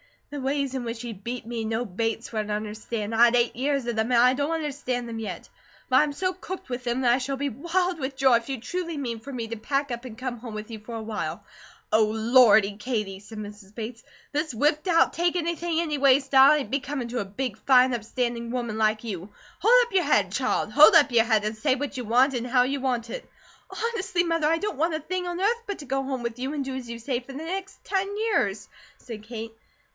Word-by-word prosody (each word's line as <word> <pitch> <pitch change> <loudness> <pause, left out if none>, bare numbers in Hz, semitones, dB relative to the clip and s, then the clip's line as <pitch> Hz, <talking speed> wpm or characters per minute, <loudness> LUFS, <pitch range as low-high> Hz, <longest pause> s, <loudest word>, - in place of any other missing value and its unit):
"The 290 -1 -5
ways 275 0 -1
in 260 -2 -3
which 230 0 -4
he 240 -2 -5
'beat' 230 +4 -6
me 230 -1 -4
no 225 +2 -1
Bates 225 +3 -3
would 215 -2 -2
understand. 215 +1 -4
I 230 +2 +7
had 240 0 +3
eight 240 -1 +2
years 275 +1 0
of 235 -2 -3
them, 220 +3 0
and 235 - +5
I 250 +1 +6
don't 285 +3 -1
understand 285 -6 -2
them 225 -1 -5
yet; 220 - -6 0.4
but 260 - +5
I - - +6
am 295 -1 -2
so 370 +5 -1
cooked 370 -3 -8
with 250 0 -4
them, 240 +2 0
that 245 -2 +4
I - - +3
shall 270 +1 -2
be 280 +1 -2
wild 345 +7 -1
with 270 0 -3
joy 265 -2 +5
if 230 +3 -8
you 265 -2 -3
truly 335 +6 -4
mean 240 -5 -3
for 265 +5 -9
me 235 -4 -4
to 230 - -4
pack 275 +4 -1
up 240 +1 -5
and 225 -3 -9
come 255 -1 -4
home 235 -1 -8
with 215 +2 -7
you 220 - -6
for 230 +2 -8
awhile." 220 -1 -4 0.5
"Oh, 220 0 +5
Lordy, 220 -2 +4
Katie!" 210 -4 -3
said 215 +2 -10
Mrs. 205 -1 -10
Bates. 230 +1 -6 0.3
"This 300 0 -1
whipped 295 - +1
out, 335 -2 +4
take 345 +1 +1
anything 340 -1 -1
anyway 280 -4 +4
style 270 +1 +6
ain't 295 -4 -1
becomin' 270 -2 -2
to 245 +1 -2
a 205 - -2
big, 210 +2 -4
fine, 255 -1 +6
upstanding 235 0 -2
woman 235 -3 -3
like 215 0 +1
you. 195 -4 -5 0.3
Hold - - +6
up 470 - -15
your 370 -3 +3
head, 205 -10 +2
child! 230 -2 0
Hold 300 +6 +8
up 290 -4 +6
your 230 -1 +4
head, 220 -3 +2
and 215 +1 -2
say 265 +2 +2
what 280 0 -4
you 250 - -4
want, 250 +5 +4
an' 245 -1 -2
how 250 0 +3
you 275 +2 -1
want 245 -3 -1
it!" - - -7 0.4
"Honestly, 385 -6 -1
Mother, 330 -3 +1
I 325 +1 +3
don't 410 -3 -3
want 325 +2 +1
a - - -2
thing 360 +3 -3
on 350 0 -3
earth 465 +4 +2
but 405 - -4
to 290 - -8
go 270 +1 -1
home 265 -2 -4
with 235 0 -4
you 265 +3 -3
and 290 -2 -2
do 265 - -4
as 260 -2 -6
you 235 0 -6
say 240 +1 -2
for 260 +2 -12
the - - -7
next 380 +4 -6
ten 390 -1 0
years," 440 0 0 0.3
said 225 -4 -9
Kate. 225 0 -7
255 Hz, 245 wpm, -26 LUFS, 225-290 Hz, 0.5 s, Hold